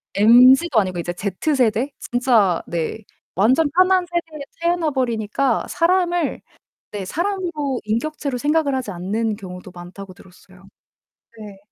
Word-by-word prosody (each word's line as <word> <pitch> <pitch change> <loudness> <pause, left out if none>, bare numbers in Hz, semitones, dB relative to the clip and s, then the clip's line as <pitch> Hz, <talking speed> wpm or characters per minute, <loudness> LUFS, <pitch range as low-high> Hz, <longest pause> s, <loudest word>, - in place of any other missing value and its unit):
MZ도 250 +6 +6
아니고 185 -3 -2
이제 175 +1 -4
Z 200 - -2
세대? 245 +1 +1
진짜 235 -8 +1
네. 170 +5 -3 0.4
완전 260 - +3
편한 370 0 +4
세대에 335 -3 -5 0.2
태어나 340 -2 0
버리니까 240 -1 -1
사람을 350 -2 0 0.5
네. 200 -2 -5
사람으로, 340 - -2
"인격체로 275 +5 -3
생각을 290 +1 +1
하지 255 -6 -3
않는 210 +5 -2
경우도 180 -2 -10
많다."고 185 +2 -11
들었어요. 185 +1 -19 0.7
네. 205 -2 -10
245 Hz, 295 characters per minute, -20 LUFS, 200-310 Hz, 0.7 s, MZ도